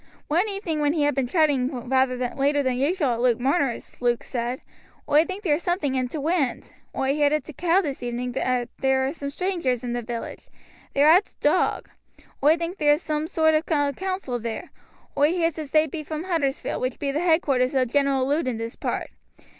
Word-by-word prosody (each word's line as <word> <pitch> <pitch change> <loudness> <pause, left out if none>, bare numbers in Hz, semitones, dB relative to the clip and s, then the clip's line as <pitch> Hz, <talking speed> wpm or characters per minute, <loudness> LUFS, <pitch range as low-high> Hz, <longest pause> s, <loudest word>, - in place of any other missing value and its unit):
One 350 +8 +2
evening 390 -6 -3
when 295 0 +2
he 310 -3 +1
had 290 - +2
been 265 -1 0
chatting 265 -5 +1
rather 260 0 +2 0.2
later 285 +1 +1
than 260 -1 +1
usual 295 +2 +1
at 235 - -3
Luke 245 -2 +3
Marner's, 270 -1 -1
Luke 240 -1 +1
said: 245 0 -3 0.5
"Oi 300 +3 +4
think 385 +3 -6
there's 310 -3 +1
something 345 -7 -1
i' 260 - +1
t' 285 - -6
wind. 300 -2 -1 0.2
Oi 270 +1 +1
heerd 290 0 +2
at 305 - 0
t' 310 - -10
Cow 350 +6 +2
this 285 -7 -4
evening 245 +1 -3
that 250 -1 -1
there 265 0 +2
are 270 - -2
some 280 -4 -5
straangers 285 -8 -1
i' 240 - -2
the 240 - -2
village. 235 0 -6 0.5
They're 285 +2 +5
at 370 +5 +5
t' - - -24
Dog. - - +1 0.5
Oi 310 +3 +5
thinks 340 +3 -4
there's 295 +1 +3
soom 305 0 -2
sort 315 -1 +2
ov 310 +1 +1
a 290 -2 +2
council 370 -8 -3
there. 230 +9 -5 0.4
Oi 295 +4 +3
heers 330 -3 0
as 305 -3 -6
they 310 +2 +4
be 315 +1 -5
from 310 +1 -5
Huddersfield, 320 -7 -1
which 255 0 -2
be 280 -1 -2
the 295 - -1
headquarters 290 -7 +2
o' 260 -1 +3
General 270 +1 +1
Lud 295 +1 0
in 245 -3 -1
this 230 +1 -5
part. - - -3
285 Hz, 210 wpm, -24 LUFS, 255-320 Hz, 0.5 s, They're